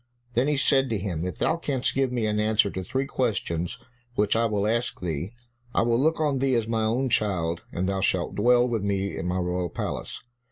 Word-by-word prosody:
Then 125 +3 +2
he 150 -1 +2
said 135 -1 +3
to 110 - 0
him, 90 -4 -3
"If 90 - -5
thou 160 - +1
canst 135 -6 -1
give 135 -1 +1
me 120 -3 0
an 105 0 0
answer 105 -1 +3
to 95 - -4
three 130 +8 -1
questions 100 -9 -1 0.4
which 105 -1 +2
I 115 +1 +3
will 105 -2 0
ask 115 +3 0
thee, 85 +3 -3 0.4
I - - +4
will 115 0 +2
look 160 +4 +2
on 145 -4 +1
thee 135 -1 +2
as 115 -2 0
my 110 -1 0
own 125 +5 +1
child, 85 -7 0
and 90 +2 -1
thou 95 0 -1
shalt 95 -3 0
dwell 120 +3 +4
with 115 -3 -1
me 100 -1 -1
in 85 - -3
my 90 +1 0
royal 90 0 -1
palace." - - -4
110 Hz, 220 wpm, -26 LUFS, 95-125 Hz, 0.4 s, I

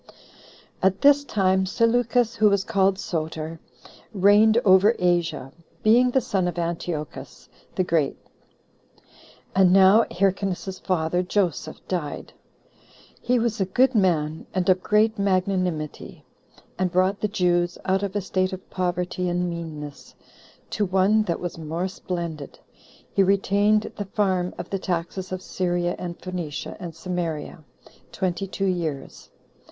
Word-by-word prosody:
10. - - -21 0.7
At 190 +1 +2
this 285 0 +6
time 190 -6 +1
Seleucus, 230 +2 +2
who 215 -1 +5
was 200 -1 +1
called 195 -3 +2
Soter, 160 -2 -4 0.6
reigned 205 +3 +5
over 195 +4 +6
Asia, 170 -6 0 0.3
being 240 +4 +5
the 265 +1 +2
son 190 -5 -1
of 175 -1 -4
Antiochus 170 -2 -5 0.3
the 185 - +1
Great. 160 -5 0 1.4
And 190 -1 +5
[now] 195 +4 +6
Hyrcanus's 190 0 -1
father, 175 -1 0
Joseph, 180 -5 -2
died. 170 -6 -4 0.9
He 250 +1 +1
was 230 -3 -1
a - - +2
good 255 +7 +2
man, 160 -7 +1
and 185 -1 0
of 185 0 +4
great 215 +2 +2
magnanimity; 185 -5 -1 0.5
and 185 -1 0
brought 185 +3 +1
the 210 - +1
Jews 175 -3 +1
out 190 0 +1
of 200 0 -4
a 205 - 0
state 185 0 -1
of 185 - -8
poverty 180 0 -2
and 180 +1 0
meanness, 155 -4 -8 0.6
to 210 - 0
one 195 +3 +3
that 170 - -2
was 175 -2 -5
more 165 +4 -3
splendid. 170 -5 -6 0.6
He - - +3
retained 200 +2 +2
the 205 - -3
farm 185 -2 -1
of - - -7
the 195 - -1
taxes 180 +1 -3
of 185 0 -4
Syria, 175 -1 -1
and 175 -1 -6
Phoenicia, 175 -5 -5
and 170 -3 -7
Samaria 165 -3 -4 0.5
twenty 185 0 -2
two 195 +1 -3
years. 165 -7 -3
185 Hz, 135 wpm, -24 LUFS, 175-200 Hz, 1.4 s, this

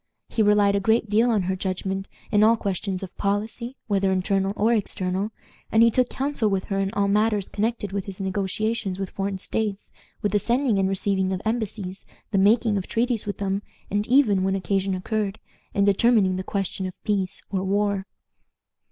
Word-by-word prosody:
He 225 - 0
relied 205 -1 +4
a - - +3
great 220 +2 +2
deal 225 +4 +4
on 215 -5 +2
her 185 +1 -1
judgment 190 +1 -3 0.2
in 210 -1 +5
all 225 +2 +5
questions 195 -1 -2
of 185 - -8
policy, 220 +5 -2
whether 195 -2 +1
internal 195 +1 +1
or 220 +3 +3
external; 195 -1 -1 0.4
and 225 +1 +6
he 230 - +6
took 250 +1 +2
counsel 270 -5 0
with 195 -1 0
her 195 -1 -2
in 195 0 0
all 200 0 +2
matters 210 0 +2
connected 215 -1 -2
with 200 -1 -3
his 195 -1 -6
negotiations 195 +1 -1
with 195 -1 -4
foreign 195 0 -2
states, 205 +1 -3 0.3
with 205 - +1
the 205 - +3
sending 235 -1 +1
and 190 0 +2
receiving 190 -1 0
of 185 0 -2
embassies, 215 -4 -3 0.3
the 195 - +2
making 215 +2 +4
of 190 - -3
treaties 235 -2 0
with 205 - -3
them, 195 0 -1 0.3
and 205 +1 0
even, 235 -8 +4
when 190 0 +1
occasion 195 0 0
occurred, 205 +2 -2 0.4
in 200 - +3
determining 200 -1 +4
the 185 - -3
question 195 -1 -2
of 185 - -11
peace 195 -3 -1
or 190 -2 -1
war. 200 0 0
200 Hz, 185 wpm, -24 LUFS, 190-220 Hz, 0.4 s, and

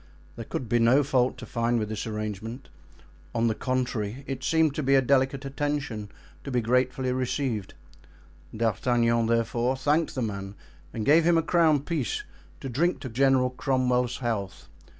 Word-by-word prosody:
There - - -7
could 125 - -4
be 120 +2 +2
no 125 +5 +5
fault 130 -2 +1
to 125 - -8
find 120 0 0
with 110 -2 -1
this 110 +1 -4
arrangement; 110 +3 -5 0.7
on 115 - +2
the 115 - +2
contrary, 125 -1 -2
it 135 -1 -5
seemed 160 -3 +2
to 155 - -2
be 135 0 +3
a - - +6
delicate 135 +1 +1
attention, 140 -7 -3 0.3
to - - -6
be 125 -2 +1
gratefully 125 +2 +1
received; 125 -5 -2 0.8
D'Artagnan, 115 +1 +1
therefore, 120 +2 +1
thanked 150 +5 +1
the 130 - -1
man 100 -2 -5 0.4
and 110 - -4
gave 160 +3 +5
him 170 0 +4
a 165 - +2
crown 160 -5 +3
piece 145 - -2 0.4
to - - -5
drink 160 +9 0
to 130 - -5
General 130 +1 +3
Cromwell's 125 -2 0
health. 110 -6 -4
125 Hz, 165 wpm, -27 LUFS, 115-135 Hz, 0.8 s, a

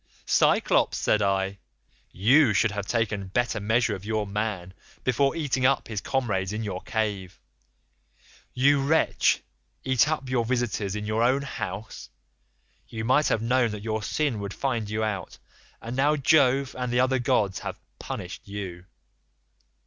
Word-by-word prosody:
"'Cyclops,' - - +3
said 105 - +1
I, 95 0 0 0.5
'you 120 - +4
should 110 +1 +3
have 100 -1 -4
taken 105 -4 -1
better 120 +3 0
measure 110 +2 +1
of 95 -2 -6
your 110 0 -1
man 100 -3 -3 0.3
before 135 +4 +1
eating 145 -5 -1
up 135 +1 +2
his 105 -3 -4
comrades 100 -9 -1
in 110 +1 -3
your 95 -3 -4
cave. 105 -5 -3 1.2
You 140 +2 +4
wretch, 160 +4 +2 0.4
eat 130 +2 +3
up 150 -4 -2
your 125 -2 +1
visitors 115 -5 -1
in 105 0 -4
your 110 +1 0
own 130 +4 +2
house? 110 -5 -6 0.8
You 110 -1 -5
might 145 +5 +3
have 110 - 0
known 125 0 +2
that 105 -1 -6
your 110 -1 -2
sin 135 +1 -1
would 100 -1 -5
find 120 -6 -2
you 110 +1 -1
out, 105 -3 -4 0.5
and 115 +2 -5
now 145 +3 +3
Jove 140 -2 +3
and 125 -1 -2
the 120 - +2
other 130 0 +2
gods 110 -6 +1
have - - -6 0.2
punished - - -7
you. 95 -3 -6
110 Hz, 155 wpm, -26 LUFS, 100-130 Hz, 1.2 s, you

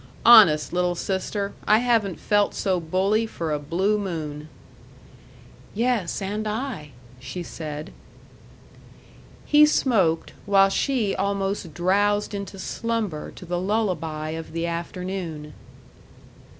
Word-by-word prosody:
Honest, 205 -12 +7
little 180 0 +1
sister, 200 +2 -3
I 215 - +6
haven't 225 -6 +1
felt 205 -1 +1
so 185 -2 0
bully 195 +7 +1
for 165 -7 -4
a 150 - -1
blue 185 +8 0
moon." 155 -6 -5 1.3
"Yes, 225 -5 0
and 210 +3 -3
I 215 - -4 0.2
" - - -21
she 135 +8 -6
said. 155 -2 -7 1.5
He 295 0 +6
smoked, 195 - +1
while 195 -1 +5
she 225 -1 0
almost 195 -3 -2
drowsed 205 +4 +1
into 200 -1 -6
slumber 215 -5 -3
to - - -10
the 175 0 -2
lullaby 175 -7 -1
of 160 0 -6
the 165 0 -2
afternoon. 170 -2 -5
190 Hz, 115 wpm, -24 LUFS, 165-210 Hz, 1.5 s, Honest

